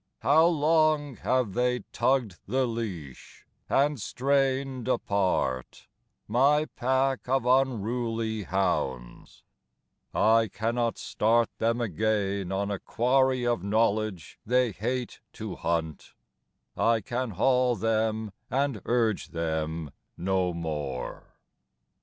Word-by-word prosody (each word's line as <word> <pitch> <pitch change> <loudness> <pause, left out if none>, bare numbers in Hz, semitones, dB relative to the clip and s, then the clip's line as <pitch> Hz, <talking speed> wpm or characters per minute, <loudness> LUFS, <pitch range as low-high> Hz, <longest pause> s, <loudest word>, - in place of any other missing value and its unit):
How 155 +5 +5
long 155 -3 +2
have 125 -6 0
they 125 +1 +1
tugged 125 -10 0
the 130 +5 +1
leash, 100 - -6 0.2
and 140 -2 +2
strained 135 0 0
apart 95 - -1 0.4
My 140 +7 +3
pack 130 -1 -1
of 135 -1 +1
unruly 115 -3 0
hounds: 65 -11 -2 0.7
I 110 0 +3
cannot 115 +3 -1
start 115 +2 +1
Them 115 +1 +1
again 100 -2 -1
on 100 +1 -1
a 100 - -2
quarry 130 +1 +1
of 120 -5 +1
knowledge 105 -3 0
they 125 0 +2
hate 120 +5 -3
to 110 -4 -6
hunt, 80 -2 -3 0.6
I 115 -1 +3
can 120 +4 -3
haul 125 +4 +2
them 110 0 0 0.2
and 135 -4 0
urge 115 -4 +1
them 80 -2 -3 0.3
no 95 0 0
more. 75 -6 -5
115 Hz, 105 wpm, -27 LUFS, 95-130 Hz, 0.7 s, How